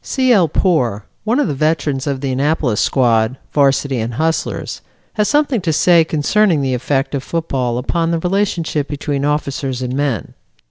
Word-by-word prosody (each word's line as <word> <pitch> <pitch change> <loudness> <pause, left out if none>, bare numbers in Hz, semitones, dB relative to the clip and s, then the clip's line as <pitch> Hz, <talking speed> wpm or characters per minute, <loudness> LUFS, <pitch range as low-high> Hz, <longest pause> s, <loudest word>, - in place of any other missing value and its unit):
C. 260 -2 +2
L. 185 -6 +4
Poor, 135 - 0 0.2
one 235 +5 +1
of - - +2
the 150 - -1
veterans 145 -1 -1
of 135 -2 -2
the 135 -2 -2
Annapolis 135 -4 0
squad, 120 -1 +2 0.2
Varsity 140 -2 +2
and 115 +1 -3
Hustlers, 160 +4 -2 0.3
has 210 -2 +1
something 290 -6 +1
to 165 - 0
say 170 +2 +4
concerning 160 +1 +1
the 130 -1 0
effect 135 +3 -1
of 140 - -1
football 135 -7 -2
upon 165 +6 -1
the 170 - +1
relationship 175 -5 -1
between 145 -1 -3
officers 140 -3 -2
and 125 0 -3
men. 140 -7 -2
145 Hz, 170 wpm, -17 LUFS, 130-170 Hz, 0.3 s, L